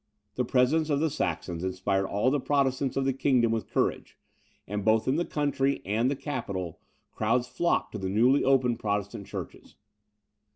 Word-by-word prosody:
The 125 - -1
presence 135 +6 +2
of 145 -2 +2
the 160 0 +1
Saxons 85 -8 -3
inspired 95 +1 -1
all 105 +6 +1
the 145 - +1
Protestants 135 -1 0
of 135 - +1
the 135 - +2
kingdom 125 -3 +2
with 115 -1 -2
courage; - - -1 0.5
and, 105 +1 -3
both 110 +1 +2
in 130 - +2
the 175 +2 0
country 140 -2 0
and 110 +6 +1
the 140 - 0
capital, 100 - -4 0.3
crowds 120 +3 0
flocked 170 +7 0
to 105 - -5
the 95 -1 -3
newly 120 +8 +3
opened 130 -3 +2
Protestant 100 -1 -3
churches. - - -8
125 Hz, 170 wpm, -28 LUFS, 105-140 Hz, 0.5 s, newly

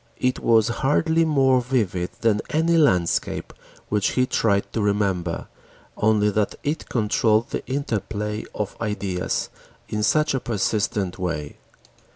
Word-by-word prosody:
It 125 0 0
was 115 0 +3
hardly 160 +4 +2
more 135 -4 +3
vivid 105 -8 -1
than 110 -2 +2
any 165 +2 +2
landscape 95 - +1 0.4
which 105 -2 +1
he 125 - +3
tried 100 -5 0
to 110 - 0
remember, 100 -4 0 0.5
only 105 -1 +2
that 105 0 0
it 150 +3 -3
controlled 110 0 +1
the - - -3
interplay 110 -5 -3
of 105 -2 -3
ideas 100 -4 -2 0.4
in 105 - -2
such 150 +7 +2
a 135 - +1
persistent 105 -4 -1
way. 85 -5 -3
110 Hz, 130 wpm, -23 LUFS, 100-130 Hz, 0.5 s, was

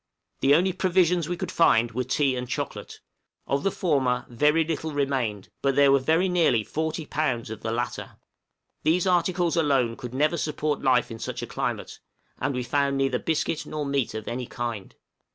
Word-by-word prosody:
The 140 +2 +5
only 185 +3 +2
provisions 180 -3 +2
we 175 - -2
could - - -4
find 120 -8 +4
were 125 +3 -2
tea 135 +1 +1
and 125 0 -5
chocolate; - - -5 0.4
of 140 0 0
the 195 - +1
former 130 -10 0
very 150 +7 +3
little 160 0 -3
remained, 130 -8 -1
but 135 -1 +1
there 140 -1 +6
were 140 - +5 0.3
nearly 165 -11 +2
40 160 +5 -3
pounds 130 -7 -2
of 110 -1 -7
the 110 - -3
latter. 120 +1 -4 0.7
These 170 +4 +2
articles 180 -1 +1
alone 135 -8 +2
could 125 +1 -8
never 150 +5 +2
support 150 -1 -2
life 125 -2 +2
in 115 - -7
such - - -5
a - - -2
climate, - - -4 0.4
and 140 - -1
we 125 - -2
found 140 +2 0
neither 135 -2 +1
biscuit 160 -1 -1
nor 150 -1 -3
meat 140 -5 -1
of 110 -1 -6
any 120 0 -4
kind. 115 -5 -5
140 Hz, 180 wpm, -26 LUFS, 125-160 Hz, 0.7 s, there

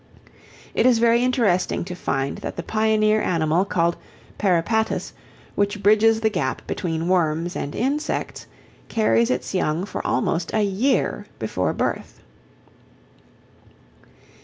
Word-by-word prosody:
It - - +3
is 245 -2 +5
very 235 +1 +3
interesting 225 -10 +1
to 180 - -6
find 140 -6 -2
that - - -6
the 170 - -5
pioneer 215 0 +2
animal 165 +2 +1
called 170 -3 0 0.4
Peripatus, 205 +4 0 0.4
which 205 0 -1
bridges 220 +2 +4
the 220 - +3
gap 135 -10 -2
between 165 -2 -3
worms 175 -1 +1
and 145 - -4
insects, 280 +6 -2 0.4
carries 115 - +2
its 125 0 -2
young 160 +5 0
for 205 - -5
almost 165 +3 -1
a 215 - +3
year 205 +7 0
before - - -1
birth. - - -3
195 Hz, 120 wpm, -22 LUFS, 165-220 Hz, 0.4 s, is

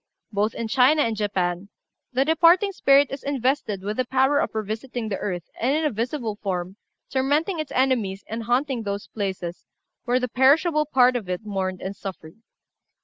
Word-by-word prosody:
Both 210 +1 0
in 230 - -3
China 270 +5 +4
and 225 -1 -1
Japan 195 -2 -2 0.4
the 265 +1 +1
departed 340 +5 +4
spirit 280 -5 +4
is 275 - -5
invested 260 -7 -1
with 210 +2 -3
the 255 - +1
power 265 +3 +2
of - - -2
revisiting 220 +2 -4
the 195 - -2
earth, 180 -4 -3 0.2
and, 260 +5 +1
in 315 0 0
a 300 - +1
visible 230 -1 -3
form, 185 -1 -3 0.3
tormenting 290 +7 +1
its 310 -3 -4
enemies 235 -7 0
and 225 +1 -5
haunting 250 +1 0
those 200 -1 -4
places 190 -4 -5 0.4
where 250 +1 +2
the 250 - -1
perishable 300 +5 +3
part 255 -3 +4
of 215 -7 -3
it 180 +4 -3
mourned 190 -3 -3
and 195 +1 -4
suffered. 185 -3 -8
240 Hz, 175 wpm, -24 LUFS, 200-275 Hz, 0.4 s, China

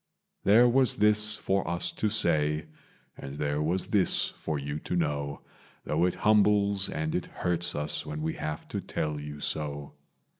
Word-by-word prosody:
"There 115 +5 +6
was 130 -1 +3
this 105 +1 +4
for 95 -1 -1
us 85 0 -2
to 110 - -1
say 80 -7 +2 0.5
and 70 +1 -8
there 75 0 -1
was 85 +5 0
this 100 -4 +2
for 80 -1 -4
you 70 +2 -4
to - - -4
know, 70 -4 -2 0.4
Though 80 +3 +1
it 90 - 0
humbles 100 -2 +3
and 80 0 -3
it 90 - -2
hurts 85 0 -2
us 75 0 0
when 75 0 -5
we 80 - -1
have 75 0 -5
to - - -3
tell 75 -1 -3
you 75 0 -8
so. 75 -1 -4
80 Hz, 165 wpm, -28 LUFS, 75-100 Hz, 0.5 s, There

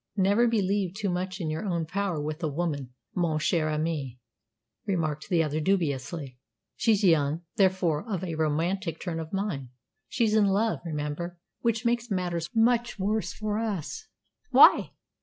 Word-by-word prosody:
"Never 205 +5 +4
believe 200 -4 0
too 205 -1 -2
much 185 +2 -3
in 160 -4 -2
your 155 +1 -3
own 170 -5 -1
power 190 -1 -2
with 155 +3 -4
a 160 - 0
woman, 145 -5 -3 0.2
mon 170 -4 +1
cher 155 0 +1
ami," 150 -5 -2 0.7
remarked 155 -5 -1
the 170 -4 +3
other 155 0 -1
dubiously. 150 -6 -1 0.4
"She's 215 -3 +2
young, 160 -2 +3
therefore 185 -1 +2
of 190 -2 -2
a 175 -3 -3
romantic 160 +3 -1
turn 170 -3 -3
of 160 -1 -6
mind. 190 -10 -3 0.4
She's 225 -3 +1
in 215 -2 +4
love, 210 +3 +1
remember, 160 +2 -4 0.2
which 230 0 0
makes 235 0 +1
matters 175 -4 -2
much 235 +1 +2
worse 210 +3 -1
for 215 0 -2
us." 210 -8 -3 0.4
"Why?" - - +7
175 Hz, 155 wpm, -27 LUFS, 155-200 Hz, 0.7 s, Why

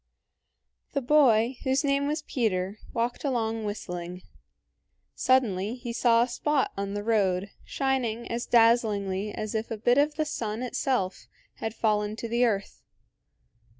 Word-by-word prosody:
The 280 - 0
boy, 245 -3 +4
whose 265 +2 +1
name 280 0 +1
was 300 +1 -2
Peter, 205 -6 -1
walked 240 +1 -2
along 225 -5 -1
whistling. 180 -3 -5 0.9
Suddenly 225 -5 +1
he 240 -2 -6
saw 235 -1 +4
a - - -1
spot 270 +3 0
on 200 0 -3
the 205 - -3
road 200 -3 +1
shining 250 -4 -1
as 235 +1 -3
dazzlingly 210 -4 +3
as 215 0 -5
if 220 0 -2
a 225 - -4
bit 245 +5 +3
of 295 +1 +2
the 310 - 0
sun 230 -6 -3
itself 245 -6 -1 0.3
had 225 0 -4
fallen 210 -1 0
to 230 - -5
the 235 +2 +2
earth. 205 -4 -2
230 Hz, 145 wpm, -27 LUFS, 210-255 Hz, 0.9 s, boy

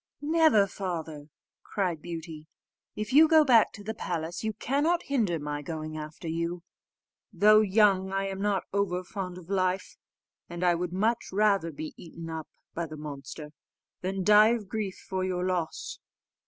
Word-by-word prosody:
"Never, 310 -9 +5
father!" 165 -7 -5 0.3
cried 180 -6 -2
Beauty: 160 -2 -7 0.5
"If 215 +4 -4
you 310 +3 +8
go 315 -1 +6
back 235 -5 +5
to 205 - -10
the 220 +2 -4
palace, 170 -3 -4
you 220 - 0
cannot 290 - 0
hinder 220 -12 0
my 145 -1 -4
going 155 +1 -5
after 155 +1 -7
you; 170 +1 -2 0.7
though 210 +2 +6
young, 195 -2 +3
I 195 0 0
am 195 0 -5
not 205 -2 +1
over 185 -3 0
fond 180 -1 -6
of 180 -2 -12
life; 185 -1 -1 0.5
and 175 +1 -5
I 175 -1 +4
would 175 +1 -2
much 220 +6 0
rather 195 -4 +2
be 155 +1 -7
eaten 165 -1 -9
up 160 -1 -5 0.3
by 170 0 -3
the 155 0 -9
monster, 150 0 -8 0.5
than 190 +1 -2
die 210 +4 +6
of 215 -4 -6
grief 205 -2 -3
for 190 -1 -2
your 180 -1 -1
loss." 180 -3 -3
185 Hz, 165 wpm, -28 LUFS, 165-210 Hz, 0.7 s, you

